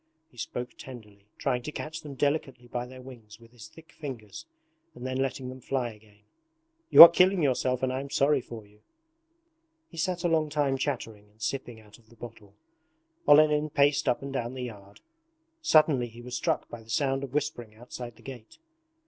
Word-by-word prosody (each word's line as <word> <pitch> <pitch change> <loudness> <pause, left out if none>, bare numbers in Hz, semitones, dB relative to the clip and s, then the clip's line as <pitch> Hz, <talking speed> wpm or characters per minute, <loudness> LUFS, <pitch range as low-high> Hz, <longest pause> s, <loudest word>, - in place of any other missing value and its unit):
He 120 - -24
spoke 125 +2 -5
tenderly, 105 -6 -12
trying 125 -3 -1
to 150 - -6
catch 155 +1 -6
them 145 -2 -9
delicately 135 -3 -2
by 120 0 -4
their 130 0 -12
wings 115 -4 -13
with 115 0 -18
his 120 -3 -12
thick 160 0 -17
fingers 120 - -9 0.5
and 125 - -9
then 130 0 -3
letting 135 -1 -2
them 130 0 -10
fly 125 -2 -2
again. 105 -1 -20 0.7
'You - - +13
are - - +14
killing 180 +1 +3
yourself 130 -2 0
and 130 0 0
I 130 - -2
am 140 +1 -7
sorry 140 0 +2
for 115 -3 -10
you!' 105 +1 -24 1.1
He 165 - -14
sat 175 +1 -2
a - - +2
long 160 -2 +1
time 145 -2 0
chattering 115 -7 -4
and 105 +1 -31
sipping 120 -1 -4
out 105 +1 -18
of 110 -2 -27
the 115 - -19
bottle. 105 -3 -12 0.7
Olenin 150 +1 +5
paced 145 +1 +2
up 125 - -1
and 140 0 -6
down 120 -1 -3
the 130 - -5
yard. 100 -4 -10 0.6
Suddenly 155 - +3
he 120 +1 -13
was 125 0 -6
struck - - -1
by 120 - -10
the 110 - -20
sound 135 +2 0
of 135 0 -7
whispering 130 -7 -3
outside 120 0 -9
the 115 - -20
gate. 125 -5 -11
130 Hz, 195 wpm, -28 LUFS, 115-145 Hz, 1.1 s, are